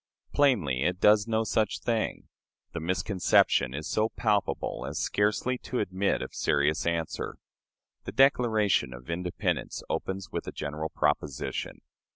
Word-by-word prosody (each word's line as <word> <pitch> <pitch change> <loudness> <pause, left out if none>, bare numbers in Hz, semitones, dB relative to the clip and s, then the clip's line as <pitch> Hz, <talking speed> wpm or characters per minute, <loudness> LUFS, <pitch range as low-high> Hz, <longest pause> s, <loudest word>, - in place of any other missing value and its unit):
Plainly, 95 - +2
it 90 +4 0
does 105 +1 +5
no 110 0 +1
such 110 -1 0
thing. 115 -2 -2 0.5
The - - -3
misconception 85 - +2
is 75 +1 -4
so 110 +1 +1
palpable 105 -4 -1
as - - -5
scarcely 105 +5 0
to 125 - -4
admit 95 0 0
of - - -8
serious 75 +3 +1
answer. 85 -1 -2 0.7
The - - -4
Declaration 110 - +3
of 60 +6 -8
Independence 90 +1 -2
opens 95 0 -3
with - - -4
a - - -3
general 75 +2 -4
proposition. 75 -2 -2
95 Hz, 135 wpm, -28 LUFS, 80-110 Hz, 0.7 s, does